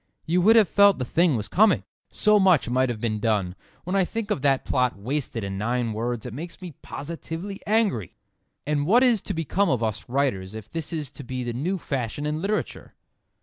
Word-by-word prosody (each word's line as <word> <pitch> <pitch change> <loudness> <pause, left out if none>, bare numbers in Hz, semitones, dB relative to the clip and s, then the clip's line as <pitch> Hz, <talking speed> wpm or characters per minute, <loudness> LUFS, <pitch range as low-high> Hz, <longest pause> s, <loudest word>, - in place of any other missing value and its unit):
You 175 +3 +2
would 220 +5 +6
have 220 -4 +6
felt 200 +1 +5
the 125 - -2
thing 165 +3 +2
was 105 -3 -2
coming. 210 0 +3 0.3
So 210 -1 +4
much 185 -9 +4
might 130 +1 +1
have 120 -3 -3
been 110 -2 -1
done. 105 -5 0 0.3
When 180 +3 -3
I 195 - +4
think 220 +3 -4
of 145 - 0
that 135 -2 +2
plot 125 -4 +1
wasted 120 +1 -3
in 95 0 -4
nine 120 +1 -1
words 115 +1 -3
it 125 - -6
makes 165 +7 -7
me 180 -3 -8
positively 165 +6 -6
angry. 205 - +1 0.5
And 145 0 0
what 240 +7 +5
is 240 -6 +3
to 195 - -4
become 165 +5 0
of 120 -3 +1
us 110 0 -3
writers 115 -8 -1
if 110 -1 -9
this 165 -1 -4
is 150 -5 -3
to 145 - -10
be 125 0 -4
the 120 -1 -3
new 170 +11 -1
fashion 135 -3 -3
in 150 +1 -2
literature? 210 +3 -3
145 Hz, 210 wpm, -25 LUFS, 120-185 Hz, 0.5 s, would